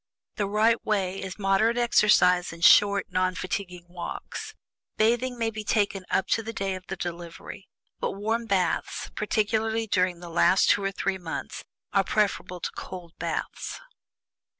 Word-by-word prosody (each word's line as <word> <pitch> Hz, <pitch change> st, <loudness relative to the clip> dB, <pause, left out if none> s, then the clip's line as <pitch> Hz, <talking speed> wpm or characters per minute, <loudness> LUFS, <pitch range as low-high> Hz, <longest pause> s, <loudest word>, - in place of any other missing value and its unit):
The 205 Hz, -3 st, 0 dB
right 220 Hz, +3 st, +2 dB
way 195 Hz, -3 st, -1 dB
is 190 Hz, -1 st, -6 dB
moderate 205 Hz, +4 st, +2 dB
exercise, 190 Hz, -6 st, +4 dB
and 165 Hz, +1 st, -1 dB
short, 200 Hz, -1 st, +6 dB
non 185 Hz, 0 st, +1 dB
fatiguing 180 Hz, -1 st, -4 dB
walks. 185 Hz, -, -7 dB, 0.4 s
Bathing 240 Hz, +3 st, +2 dB
may 225 Hz, -1 st, 0 dB
be 215 Hz, -1 st, -6 dB
kept 205 Hz, -1 st, +1 dB
up 190 Hz, -, +1 dB
to 225 Hz, -, +2 dB
the 225 Hz, +1 st, -6 dB
day 195 Hz, -3 st, -2 dB
of 185 Hz, 0 st, -8 dB
the 190 Hz, -, -4 dB
delivery. 175 Hz, +2 st, -7 dB, 0.3 s
But -, -, -2 dB
warm 225 Hz, +3 st, -2 dB
baths, 190 Hz, -4 st, -1 dB
particularly 220 Hz, +1 st, 0 dB
during 185 Hz, -4 st, +1 dB
the 175 Hz, -1 st, -9 dB
last 170 Hz, +3 st, +4 dB
two 200 Hz, -, +1 dB
or 195 Hz, -, 0 dB
three 195 Hz, -1 st, -2 dB
months, 170 Hz, -2 st, -6 dB, 0.3 s
are 195 Hz, -, +4 dB
preferable 190 Hz, -4 st, -1 dB
to -, -, -3 dB
cold 175 Hz, -3 st, -8 dB
baths." -, -, -4 dB
195 Hz, 155 wpm, -26 LUFS, 180-220 Hz, 0.4 s, short